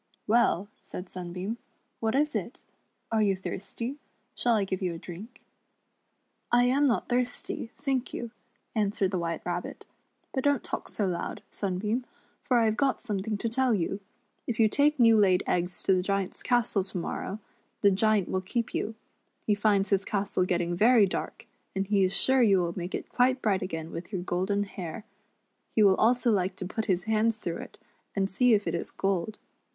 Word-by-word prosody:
"Well," 215 -4 +3
said 180 0 -8
Sunbeam, 185 +5 -5 0.4
"what 225 +2 0
is 300 +2 +2
it? - - -4 0.5
Are 220 -1 +2
you 200 -2 +3
thirsty. 230 +8 -5 0.2
* 235 +4 -44
Shall 240 -2 +2
I 210 - +2
give 190 0 -3
you 180 -3 -1
a - - -6
drink. 190 +9 -10 0.3
*" - - -48
" - - -47 0.3
I 240 0 +5
am 270 +4 +3
not 240 - +1
thirsty, 245 -1 -2
thank 270 -3 -1
you," 235 -1 -5 0.4
answered 205 -3 +1
the 185 - 0
WMiite 165 -1 -3
Rabbit; 175 0 -4 0.5
"but 265 - -1
don't 285 -3 +2
talk - - -5
so 210 - -1
loud, 180 -2 -3
Sunbeam, 210 +5 -1 0.4
for 250 - +2
I 230 - +4
have 220 0 +1
got 275 -2 +1
something 210 -2 -2
to 230 - -2
tell 250 0 +2
you. 195 +1 -1 0.5
If 235 -2 -2
you 220 - +6
take 290 +6 +2
new 230 -2 +6
laid 185 -3 +4
eggs 180 0 -1
to 195 - +4
the 185 - +2
Giant's 195 0 -2
castle 240 -5 +2
to 190 0 -4
morrow, 185 +3 -3 0.4
the 200 - +6
Giant 210 0 +3
will 185 - -1
keep 225 +5 -2
you. 225 - -2 0.5
He 210 - +3
finds 205 -1 +2
his 195 -1 +3
castle 195 -3 0
getting 175 -1 0
very 225 +3 +6
dark, 190 - -4 0.3
and 195 0 0
he 200 -1 +3
is 185 - +2
sure 265 0 +4
you 205 -5 +5
will 170 -2 0
make 180 0 -4
it - - -5
quite 255 +1 +2
bright 200 -6 +1
again 165 -3 -4
with 170 +4 -7
your 185 -4 -3
golden 190 +3 0
hair. 195 +1 -7 0.7
He 215 - +5
will 195 -2 +7
also 240 +1 +3
like 190 -2 +1
to 185 - -5
put 220 +4 -3
his 185 -3 +1
hands 220 +1 +1
through 175 -5 -4
it, - - -10 0.4
and 195 -1 +1
see 245 +3 +4
if 205 - -1
it 165 - -1
is 170 - -3
gold. 195 +1 -1
205 Hz, 195 wpm, -28 LUFS, 185-235 Hz, 0.7 s, will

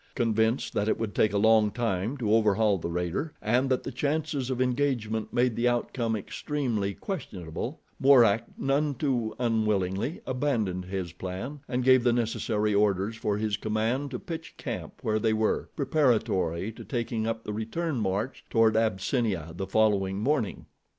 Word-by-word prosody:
Convinced 115 0 +1
that 105 +1 0
it - - +1
would 115 -2 -3
take 110 - +3
a 100 - 0
long 110 0 +5
time 115 +2 -1
to 110 -5 0
overhaul 105 -2 +3
the 85 - -4
raider, 90 - -2
and 125 +5 +1
that 130 - +1
the - - -4
chances 145 0 -1
of 130 -1 -2
engagement 125 -4 0
made 120 -1 +2
the 120 +1 +1
outcome 120 -1 0
extremely 110 -2 -2
questionable, 110 - -5 0.2
Mourak, 120 -5 +5
none 140 +1 +1
too 120 -5 -1
unwillingly, 110 - 0
abandoned 115 -9 -1
his 95 -2 -4
plan 95 +13 -6
and 125 -1 -1
gave 130 -1 +6
the 120 -1 +3
necessary 110 -2 0
orders 100 +1 +2
for 105 -2 -1
his 105 -1 -1
command 115 +6 -1
to 125 - -4
pitch 165 +4 -7
camp - - -5
where 110 -1 +1
they 110 0 +2
were, 110 0 0
preparatory 110 - +1
to - - -11
taking 115 -3 -2
up 115 0 -2
the 105 - -4
return 130 +8 -2
march 105 +4 -2
toward 115 -1 +4
Abyssinia 110 - 0
the 95 +2 -4
following 100 -3 +2
morning. 120 -1 -1
110 Hz, 160 wpm, -28 LUFS, 105-130 Hz, 0.2 s, gave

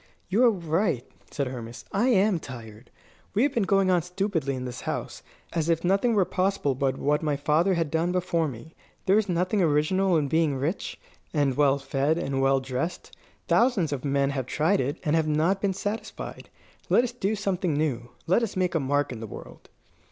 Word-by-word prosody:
"You 210 +7 +3
are - - +7
right," 170 - 0 0.2
said 140 - -2
Hermas. 120 -2 -7
"I 210 +6 +2
am 205 -6 +3
tired. 115 -4 -10 0.5
We 220 - +4
have 285 - +1
been 230 - +1
going 195 -1 +4
on 180 -1 +3
stupidly 180 -5 -2
in 130 0 -5
this 125 0 -6
house, - - -4 0.3
as 165 -1 0
if 165 -1 +1
nothing 200 +6 +2
were 195 -3 +4
possible 185 -7 0
but 135 0 -1
what 150 +1 +1
my 150 -3 0
father 160 +6 +2
had 165 -3 -1
done 165 +2 +1
before 175 -3 0
me. 135 +4 -9 0.3
There 195 +3 +5
is 215 -2 -2
nothing 180 +4 +1
original 170 +4 +2
in 145 -2 0
being 160 -1 +2
rich, 145 +8 -3 0.4
and 140 -3 +2
well 140 -1 +4
fed, 140 +3 0
and 135 -5 -1
well 135 0 +3
dressed. 130 +6 -4 0.3
Thousands 220 - +3
of 135 - -4
men 140 -1 +1
have 130 -3 -3
tried 165 +9 +2
it, 140 +5 -2
and 155 -1 +1
have 160 -1 +2
not 160 +6 +1
been 200 - +1
satisfied. 205 +3 -5 0.4
Let 240 - +5
us 250 - -2
do 220 -3 -1
something 190 -5 -1
new. 130 -6 -1 0.2
Let 185 +7 +3
us 230 - -2
make 180 -2 +1
a 165 - +2
mark 145 0 0
in 120 - -6
the 110 - -6
world." - - -11
160 Hz, 200 wpm, -26 LUFS, 140-190 Hz, 0.5 s, are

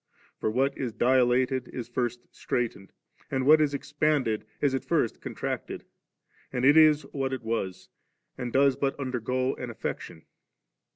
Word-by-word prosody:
For - - 0
what 135 +5 +1
is 125 -4 -3
dilated 130 +1 +2
is 120 - -6
first 120 0 -2
straitened; 115 -5 -3 0.4
and 135 -3 -1
what 155 +2 +7
is 145 -2 +1
expanded 145 -7 0
is 140 -2 +1
at 135 - -1
first - - 0
contracted; - - -5 0.7
and 125 0 -1
it 145 +2 +7
is 155 -2 +6
what 135 -1 -1
it 130 - -4
was, 110 -5 -3 0.5
and 125 -2 -4
does 135 +1 +4
but 140 0 -2
undergo 130 0 -1
an 125 - -5
affection. 85 -7 -6
130 Hz, 150 wpm, -27 LUFS, 120-140 Hz, 0.7 s, what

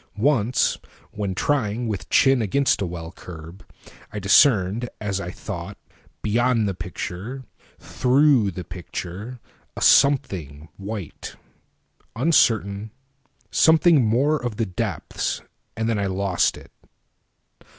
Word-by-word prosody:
Once, 125 -1 +2 0.3
when 100 -3 -3
trying 120 -1 0
with 105 -4 -4
chin 135 -2 +4
against 130 +6 +1
a 100 - 0
well 85 -1 -7
curb,I 90 +4 -13
discerned, 105 +1 +4
as 100 -2 -2
I 85 - -5
thought, 95 0 -7 0.5
beyond 115 +1 +2
the 100 - -1
picture, 90 - -6 0.3
Through 130 -4 +3
the 90 -1 -6
picture, 90 +7 -7 0.4
a - - -5
something 85 - +2
white, 100 -3 -7 0.8
uncertain, 110 -7 +2 0.6
Something 160 -3 +5
more 135 +6 +1
of 120 -3 -3
the 115 - -1
depths—and 110 +3 -4
then 115 -3 0
I 100 - 0
lost 95 -1 0
it. - - -15
105 Hz, 110 wpm, -23 LUFS, 95-125 Hz, 0.8 s, Something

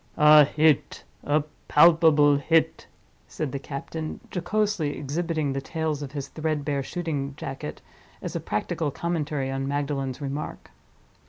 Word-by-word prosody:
"A 150 0 +8
hit—a 150 0 +1 0.2
palpable 155 -3 +6
hit," 160 +3 +1 0.4
said 155 -4 -4
the 140 - -3
captain, 155 +3 -6
jocosely 195 -5 0
exhibiting 155 +1 -2
the 135 - -2
tails 155 0 -3
of 140 -1 -7
his 140 -2 -5
threadbare 150 -3 -2
shooting 140 -3 -4
jacket, 135 - -7 0.4
as - - -6
a - - 0
practical 155 - -2
commentary 150 -4 -2
on 135 0 -2
Magdalen's 140 -2 -2
remark. 140 +1 -5
150 Hz, 120 wpm, -25 LUFS, 140-160 Hz, 0.4 s, A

